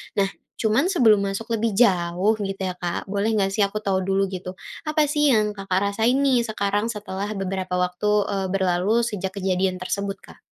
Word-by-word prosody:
nah 195 Hz, -1 st, +2 dB, 0.3 s
cuma 220 Hz, +2 st, +1 dB
sebelum 240 Hz, -, +4 dB
masuk 200 Hz, +4 st, -3 dB
lebih 225 Hz, -2 st, 0 dB
jauh 185 Hz, -2 st, +3 dB
gitu 195 Hz, -1 st, -4 dB
ya 185 Hz, -, -1 dB
Kak 175 Hz, +2 st, -4 dB
boleh 200 Hz, +1 st, 0 dB
nggak 195 Hz, -2 st, +1 dB
sih 205 Hz, -, -4 dB
aku 205 Hz, +1 st, +1 dB
tahu 190 Hz, -2 st, +1 dB
dulu 195 Hz, 0 st, +2 dB
gitu 185 Hz, 0 st, -6 dB, 0.3 s
apa 305 Hz, 0 st, +2 dB
sih 295 Hz, 0 st, +2 dB
yang 215 Hz, -5 st, +3 dB
Kakak 195 Hz, 0 st, -1 dB
rasain 225 Hz, +5 st, +2 dB
nih 250 Hz, -4 st, +3 dB
sekarang 205 Hz, 0 st, -1 dB
setelah 205 Hz, -3 st, -4 dB
beberapa 190 Hz, -1 st, -3 dB
waktu, 190 Hz, +3 st, +1 dB
eee, 195 Hz, -1 st, -1 dB
berlalu 190 Hz, +4 st, +1 dB
sejak 195 Hz, -4 st, -3 dB
kejadian 185 Hz, -1 st, 0 dB
tersebut 195 Hz, +2 st, -3 dB
Kak? -, -, -15 dB
200 Hz, 180 wpm, -23 LUFS, 190-220 Hz, 0.3 s, sebelum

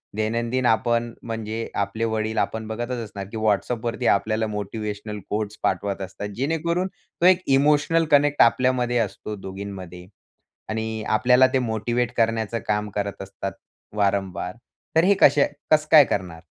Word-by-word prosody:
दैनंदिन 115 Hz, +4 st, -1 dB
आपण, 120 Hz, 0 st, +1 dB
म्हणजे 115 Hz, 0 st, -4 dB
आपले 110 Hz, +3 st, -3 dB
वडील 110 Hz, 0 st, -2 dB
आपण 110 Hz, 0 st, -1 dB
बघतच 120 Hz, +3 st, -3 dB
असणार 100 Hz, -2 st, -7 dB
की 115 Hz, -, -5 dB
WhatsAppवरती 115 Hz, +3 st, 0 dB
आपल्याला 110 Hz, +2 st, 0 dB
मोटिव्हेशनल 105 Hz, 0 st, -5 dB
कोट्स 105 Hz, 0 st, -3 dB
पाठवत 100 Hz, -1 st, -1 dB
असतात 95 Hz, +2 st, -6 dB
जेणेकरून, 165 Hz, +6 st, 0 dB
तो 190 Hz, -2 st, -6 dB
एक 185 Hz, 0 st, +6 dB, 0.2 s
इमोशनल 150 Hz, +3 st, +3 dB
कनेक्ट 145 Hz, 0 st, +4 dB
आपल्यामध्ये 125 Hz, 0 st, +3 dB
असतो 105 Hz, 0 st, -3 dB
दोघींमध्ये. 95 Hz, -2 st, -8 dB, 0.6 s
आणि 110 Hz, 0 st, -3 dB
आपल्याला 125 Hz, +4 st, +5 dB
ते 130 Hz, -, +3 dB
मोटिव्हेट 120 Hz, 0 st, -1 dB
करण्याचं 115 Hz, 0 st, +1 dB
काम 105 Hz, 0 st, 0 dB
करत 100 Hz, -1 st, -3 dB
असतात 95 Hz, 0 st, -5 dB, 0.4 s
वारंवार. 95 Hz, -3 st, -1 dB, 0.4 s
तर 160 Hz, -, +5 dB
हे 200 Hz, +3 st, +5 dB
कसे 145 Hz, 0 st, +6 dB, 0.2 s
कसं 155 Hz, 0 st, +4 dB
काय 155 Hz, -3 st, +9 dB
करणार? 90 Hz, -7 st, -3 dB
110 Hz, 140 wpm, -23 LUFS, 105-125 Hz, 0.6 s, काय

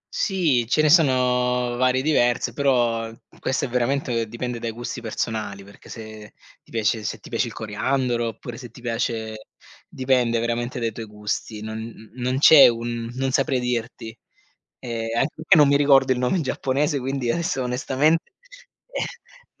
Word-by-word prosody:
Sì, 155 Hz, -, +1 dB
ce 155 Hz, -, +3 dB
ne 155 Hz, -, +4 dB
sono 125 Hz, -5 st, +3 dB
varie, 130 Hz, +1 st, +2 dB
diverse, 120 Hz, -6 st, +2 dB
però 120 Hz, -5 st, +1 dB, 0.3 s
questo 130 Hz, -, -1 dB
è -, -, -3 dB
veramente 125 Hz, -1 st, -1 dB
dipende 120 Hz, +2 st, -5 dB
dai 115 Hz, -, -3 dB
gusti 120 Hz, +2 st, -6 dB
personali, 110 Hz, -3 st, -4 dB
perché 100 Hz, +1 st, -16 dB
se 110 Hz, -2 st, -10 dB, 0.3 s
ti -, -, -28 dB
piace 110 Hz, -1 st, 0 dB
se -, -, -3 dB
ti -, -, -14 dB
piace -, -, 0 dB
il -, -, -8 dB
coriandolo 120 Hz, +2 st, -1 dB
oppure 115 Hz, +2 st, -7 dB
se 120 Hz, -3 st, -9 dB
ti 115 Hz, -, -15 dB
piace 115 Hz, -2 st, -3 dB, 0.4 s
dipende 125 Hz, -3 st, +1 dB
veramente 120 Hz, +2 st, -2 dB
dai 115 Hz, -1 st, -1 dB
tuoi 110 Hz, +1 st, -8 dB
gusti. 105 Hz, +1 st, -4 dB
Non 110 Hz, 0 st, -8 dB
non 125 Hz, +1 st, -2 dB
c'è 145 Hz, 0 st, +9 dB
un 115 Hz, 0 st, -2 dB
non 135 Hz, 0 st, -1 dB
saprei 130 Hz, 0 st, +1 dB
dirti. 120 Hz, -2 st, -4 dB, 0.6 s
E 115 Hz, -2 st, -4 dB
anche 140 Hz, -, +1 dB
perché 160 Hz, +4 st, +3 dB
non 150 Hz, -2 st, +7 dB
mi 140 Hz, 0 st, +4 dB
ricordo 140 Hz, -2 st, +5 dB
il 125 Hz, -, -1 dB
nome 125 Hz, +8 st, +1 dB
in 175 Hz, -, 0 dB
giapponese 140 Hz, +1 st, -1 dB
quindi 130 Hz, -1 st, -2 dB
adesso 170 Hz, -6 st, -1 dB
onestamente 135 Hz, +6 st, +1 dB, 1.3 s
eh -, -, -43 dB
120 Hz, 160 wpm, -23 LUFS, 115-135 Hz, 1.3 s, c'è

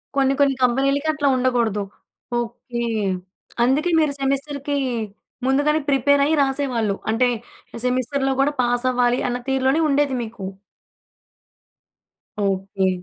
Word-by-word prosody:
కొన్ని 270 Hz, -1 st, +3 dB
కొన్ని 280 Hz, -1 st, +4 dB
కంపెనీలకి 275 Hz, +4 st, +2 dB
అట్లా 295 Hz, -2 st, 0 dB
ఉండగూడదు. 240 Hz, -5 st, +1 dB, 0.6 s
ఓకె. 240 Hz, 0 st, -5 dB, 0.8 s
అందుకే 280 Hz, +8 st, +2 dB
మీరు 305 Hz, -3 st, +2 dB
సెమిస్టర్‌‌కి 280 Hz, +1 st, -1 dB, 0.7 s
ముందుగానే 290 Hz, +4 st, +2 dB
ప్రిపేర్ 280 Hz, +1 st, +3 dB
అయ్యి 315 Hz, +2 st, +2 dB
రాసేవాళ్ళు. 260 Hz, -7 st, 0 dB
అంటే 230 Hz, +3 st, +3 dB, 0.6 s
సెమిస్టర్‌లో 255 Hz, +2 st, 0 dB
గూడా 285 Hz, +2 st, +3 dB
పాస్ 245 Hz, 0 st, 0 dB
అవ్వాలి 245 Hz, 0 st, +2 dB
అన్న 245 Hz, 0 st, -1 dB
తీరులోనే 265 Hz, +3 st, +2 dB
ఉండేది 280 Hz, -1 st, +2 dB
మీకు. 220 Hz, -3 st, -7 dB, 2.0 s
ఓకె. 195 Hz, 0 st, 0 dB
265 Hz, 105 wpm, -22 LUFS, 240-280 Hz, 2.0 s, కొన్ని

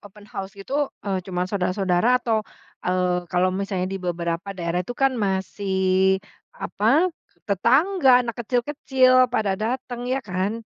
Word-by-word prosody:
open 205 Hz, +1 st, -16 dB
house 195 Hz, 0 st, -6 dB
gitu, 200 Hz, +7 st, -10 dB, 0.3 s
eee, 195 Hz, -2 st, -1 dB
cuma 180 Hz, -1 st, -1 dB
saudara-saudara 185 Hz, +4 st, +1 dB
atau, 225 Hz, -3 st, 0 dB, 0.4 s
eee, 180 Hz, -1 st, 0 dB
kalau 185 Hz, +1 st, +2 dB
misalnya 190 Hz, -1 st, -2 dB
di 195 Hz, -, -3 dB
beberapa 170 Hz, 0 st, -3 dB
daerah 170 Hz, 0 st, -1 dB
itu 245 Hz, +7 st, -7 dB
kan 270 Hz, -1 st, +3 dB
masih 190 Hz, 0 st, +1 dB, 0.4 s
apa, 265 Hz, -, +2 dB, 0.3 s
tetangga, 260 Hz, -, +4 dB
anak 230 Hz, -1 st, -4 dB
kecil-kecil, 255 Hz, +1 st, +3 dB
pada 220 Hz, -4 st, 0 dB
dateng 245 Hz, +3 st, -3 dB
ya 260 Hz, +1 st, +1 dB
kan? 195 Hz, +5 st, -2 dB
200 Hz, 135 wpm, -23 LUFS, 185-245 Hz, 0.4 s, tetangga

